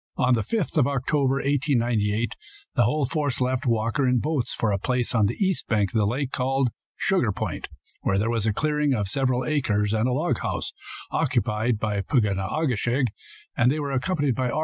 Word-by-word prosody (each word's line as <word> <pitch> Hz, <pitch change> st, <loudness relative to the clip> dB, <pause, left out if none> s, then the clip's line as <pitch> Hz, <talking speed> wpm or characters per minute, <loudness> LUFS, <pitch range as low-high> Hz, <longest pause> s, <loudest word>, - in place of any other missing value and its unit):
On 125 Hz, 0 st, +3 dB
the 115 Hz, -, +2 dB
5th 180 Hz, -, -1 dB
of 125 Hz, -, +4 dB
October, 140 Hz, 0 st, +1 dB
1898, 120 Hz, -6 st, +1 dB, 0.4 s
the -, -, +3 dB
whole 150 Hz, -2 st, +1 dB
force 145 Hz, -2 st, -1 dB
left 130 Hz, +2 st, 0 dB
Walker 115 Hz, +4 st, +1 dB
in 125 Hz, 0 st, +3 dB
boats 145 Hz, 0 st, -1 dB
for 110 Hz, -, 0 dB
a 100 Hz, -, 0 dB
place 125 Hz, +3 st, -1 dB
on 110 Hz, -4 st, +3 dB
the -, -, -2 dB
east 190 Hz, -3 st, 0 dB
bank 105 Hz, -4 st, +1 dB
of 110 Hz, -, +2 dB
the 105 Hz, -, +3 dB
lake, 130 Hz, +4 st, -2 dB
called 135 Hz, 0 st, +1 dB, 0.3 s
Sugar -, -, +1 dB
Point, -, -, -4 dB, 0.3 s
where 95 Hz, -, +1 dB
there 105 Hz, +3 st, +1 dB
was 115 Hz, -2 st, 0 dB
a -, -, +3 dB
clearing 150 Hz, +1 st, +1 dB
of 105 Hz, -3 st, -1 dB
several 130 Hz, +2 st, 0 dB
acres 110 Hz, -9 st, +1 dB
and 110 Hz, +3 st, +1 dB
a -, -, 0 dB
log 155 Hz, +6 st, 0 dB
house, -, -, -3 dB, 0.4 s
occupied 120 Hz, -3 st, +1 dB
by 105 Hz, -1 st, -1 dB
Pug 110 Hz, +3 st, +2 dB
on 100 Hz, -2 st, -1 dB
a 155 Hz, +12 st, -1 dB
ke 125 Hz, -6 st, 0 dB
shig. 125 Hz, +2 st, +1 dB, 0.5 s
They 125 Hz, +6 st, +3 dB
were 145 Hz, -2 st, -2 dB
accompanied 140 Hz, +1 st, 0 dB
by 125 Hz, +1 st, -1 dB
R. 150 Hz, -, -1 dB
125 Hz, 205 wpm, -25 LUFS, 110-140 Hz, 0.5 s, of